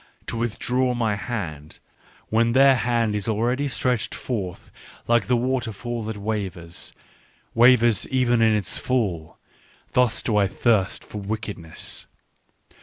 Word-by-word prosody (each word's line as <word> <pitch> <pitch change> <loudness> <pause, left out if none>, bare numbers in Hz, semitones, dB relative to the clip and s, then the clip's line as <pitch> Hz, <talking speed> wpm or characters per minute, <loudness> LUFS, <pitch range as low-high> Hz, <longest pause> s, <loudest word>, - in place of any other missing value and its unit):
"To - - -4
withdraw 125 +2 0
my 110 -3 +1
hand 85 -9 -5 0.5
when 115 +1 +2
their 135 +1 +6
hand 115 -3 +1
is 105 -2 -2
ready 120 +6 0
stretched 125 -3 -1
forth 100 -8 -5 0.4
like 120 0 +3
the 125 0 +3
waterfall 120 -2 -2
that 110 -1 -4
wavers, 95 -5 -4 0.6
wavers 120 -2 +5
even 125 -3 +2
in 110 -1 +5
its 100 -4 -1
fall: 100 -11 -1 0.3
— - - -32
thus 125 -3 +2
do 110 -3 +1
I 100 -1 +4
thirst 100 -1 +1
for 105 - -7
wickedness. 100 -5 -5
115 Hz, 130 wpm, -24 LUFS, 105-120 Hz, 0.6 s, their